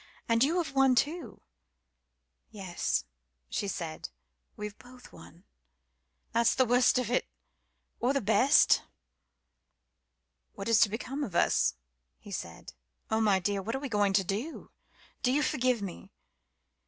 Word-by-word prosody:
And 230 +1 +3
you 320 +6 +2
have 320 -6 -2
won 270 -1 +4
too." 305 +7 -2 1.1
"Yes," 190 -4 -2 0.5
she 200 - -2
said, 165 -5 -5 0.5
"we've 210 0 -6
both 250 0 -15
won. 170 +3 -15 0.9
That's 235 0 +3
the 260 - +3
worst 245 +2 +4
of 245 -2 -1
it 250 - +1 0.7
or 245 - +2
the 275 - +1
best." 250 +5 +4 1.7
"What 195 - -7
is 230 -2 +4
to 205 - +5
become 255 +7 -4
of 190 -10 -6
us?" 60 - +2 0.4
he 205 - -13
said. 85 - -7 0.4
"Oh, 220 0 +2
my 205 -3 +4
dear 200 +2 -1
what 225 +5 -3
are - - -2
we 275 -1 -5
to 205 -3 +2
do? 215 - -5 0.5
Do 250 - +2
you 295 +3 +2
forgive 255 -7 0
me? 185 -3 -8
230 Hz, 140 wpm, -29 LUFS, 200-260 Hz, 1.7 s, to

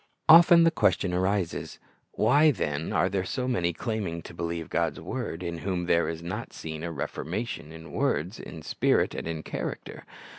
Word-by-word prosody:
Often 170 +1 +9
the 165 - +5
question 95 - +1
arises, 95 -1 -1 0.4
Why, 145 +8 +4
then, 80 - -2
are - - +2
there 95 0 -1
so 125 +6 -3
many, 90 -9 +1
claiming 95 -5 -3
to - - -10
believe 85 -1 -4
God's 80 -2 -1
word, 85 +3 -5
in 85 -1 -4
whom 90 0 -2
there 85 0 +2
is 80 0 -5
not 95 +7 -5
seen 80 -1 -6
a 85 - -3
reformation 80 +3 -4
in 80 0 -11
words, 90 +8 -1
in 80 -2 -9
spirit, - - +1
and - - -5
in 80 -1 -4
character? - - -5
85 Hz, 175 wpm, -27 LUFS, 80-105 Hz, 0.4 s, Often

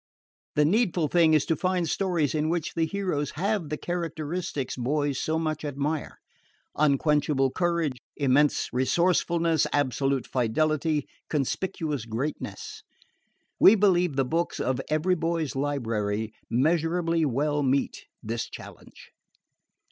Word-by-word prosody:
The 150 - +4
needful 175 -4 +2
thing 165 -1 +4
is 150 - +2
to 165 - +1
find 180 -1 0
stories 170 -4 0
in 155 0 0
which 170 -2 -2
the 165 -1 0
heroes 180 -7 -2
have 195 -1 -1
the 150 - -2
characteristics 165 -4 -3
boys 140 +2 -1
so 160 +1 0
much 155 -2 -2
admire 145 +1 -3 0.6
unquenchable 145 -2 +2
courage, 170 -7 0 0.2
immense 145 +1 +3
resourcefulness, 165 +4 +2
absolute 135 -1 0
fidelity, 150 +5 0 0.2
conspicuous 150 - -2
greatness. 155 - -5 0.8
We 205 - +8
believe 180 -6 +3
the 135 -1 +2
books 165 +6 -1
of 130 0 0
EVERY 155 +4 +2
BOY'S 165 -3 -1
LIBRARY 110 -6 -2 0.2
measurably 165 +5 +1
well 145 +2 0
meet 135 0 0 0.2
this 115 +1 -3
challenge. - - -12
155 Hz, 115 wpm, -26 LUFS, 135-170 Hz, 0.8 s, We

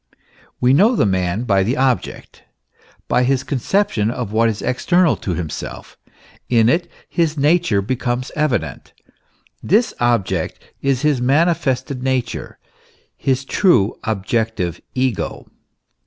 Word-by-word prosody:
We 125 +1 +4
know 210 - +5
the - - +2
man 95 +2 0
by 100 -5 +2
the 115 +7 0
object, 130 -2 -2 0.6
by - - +2
his 130 +1 +1
conception 130 - 0
of 120 -3 -4
what 115 +1 +3
is 110 -1 -4
external 175 +6 +2
to 90 - -3
himself; 80 -3 -6 0.5
in 115 -2 +4
it 170 +4 +1 0.2
his 160 -2 0
nature 145 - +2
becomes 125 +2 -2
evident; 125 - -2 0.7
this 220 +7 +2
object 100 -8 0 0.2
is 135 0 0
his 150 -5 +2
manifested 140 -2 +1
nature, 130 -3 -2 0.6
his 135 0 -1
true 125 - +3
objective 105 -4 -2
ego. 130 -4 -2
125 Hz, 120 wpm, -19 LUFS, 110-145 Hz, 0.7 s, know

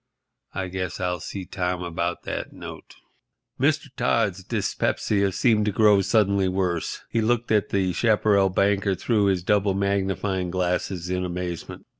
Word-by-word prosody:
I 95 0 -2
guess 90 -1 -4
I'll 90 -1 -1
see 95 +5 -6
Tom 90 0 -2
about 85 0 -3
that - - -4
note." - - -10 0.6
Mr. - - +2
Todd's - - +1
dyspepsia 100 -2 0
seemed 105 +1 +2
to - - +2
grow 105 -1 +5
suddenly 100 -2 +2
worse. 90 -3 -1
He 115 - +1
looked 120 +1 0
at 105 -2 +2
the 95 -2 0
chaparral 105 -3 +3
banker 100 +1 +1
through 105 +1 +1
his 95 -3 +1
double 100 0 +2
magnifying 95 -1 -1
glasses 90 0 -2
in 90 0 -1
amazement. 90 -1 -5
95 Hz, 145 wpm, -24 LUFS, 90-100 Hz, 0.6 s, grow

